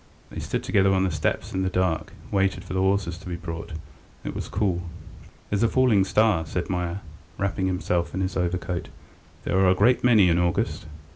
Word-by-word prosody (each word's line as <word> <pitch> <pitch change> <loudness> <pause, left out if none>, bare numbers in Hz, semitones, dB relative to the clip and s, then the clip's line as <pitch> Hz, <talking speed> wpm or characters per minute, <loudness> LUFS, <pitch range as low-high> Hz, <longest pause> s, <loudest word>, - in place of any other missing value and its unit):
They - - -6
stood - - -3
together 95 -1 +3
on 95 - +2
the 95 - 0
steps 80 -1 -2
in 95 - -1
the 95 - +1
dark, 90 -3 0
and - - -17
waited 95 -1 +1
for - - -7
the 95 - 0
horses 95 -2 +1
to 90 - -9
be 90 - -3
brought. 85 -1 -6 0.5
It - - -4
was - - -5
cool. 95 -3 0 0.7
"There's 100 0 +1
a 115 - +5
falling 115 -6 +3
star," 105 -3 +3
said 90 +2 -3
Meier, 90 +1 -2 0.4
wrapping 95 -1 -1
himself 90 -2 -1
in 95 - -1
his 95 0 -2
overcoat. 90 -1 -2 0.5
"There 95 - +1
are 95 -1 +5
a 90 - +4
great 120 +6 +3
many 110 -6 +6
in 85 0 +3
August." 85 -2 -1
95 Hz, 205 wpm, -25 LUFS, 90-100 Hz, 0.7 s, many